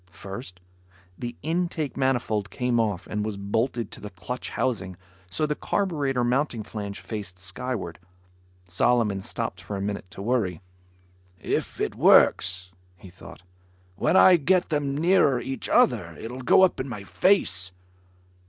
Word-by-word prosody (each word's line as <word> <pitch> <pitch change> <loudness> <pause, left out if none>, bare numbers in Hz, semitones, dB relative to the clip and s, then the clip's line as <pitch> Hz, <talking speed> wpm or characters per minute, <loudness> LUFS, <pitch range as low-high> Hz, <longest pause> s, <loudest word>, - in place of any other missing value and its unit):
First, 95 +2 -9 0.6
the 120 +3 -6
intake 165 -2 -1
manifold 120 -6 0
came 125 -2 0
off 100 -5 0
and 105 -1 -3
was 105 -2 -3
bolted 115 +4 -1
to - - -10
the 105 - -6
clutch 115 +7 -6
housing 95 -8 -2 0.3
so 90 +12 0
the 150 - 0
carburetor 145 -8 -1
mounting 125 -2 0
flange 100 -1 -6
faced 100 -5 -6
skyward. 95 -1 -4 0.7
Solomon 105 +1 +2
stopped - - -4
for 105 - -6
a - - -3
minute 100 -2 -4
to 95 - -8
worry. 105 -8 0 0.8
"If - - -2
it - - -1
works," 90 0 +4 0.3
he 90 0 -13
thought, 90 - -13 0.5
"when 185 - +2
I 185 -1 +8
get 180 +4 +2
them 145 -3 -1
nearer 160 -6 +4
each 130 0 -4
other, - - +3
it'll 125 +3 -6
go 130 - +5
up 185 - +3
in 130 - -3
my 105 -5 -6
face." 100 - +2
115 Hz, 145 wpm, -26 LUFS, 100-135 Hz, 0.8 s, I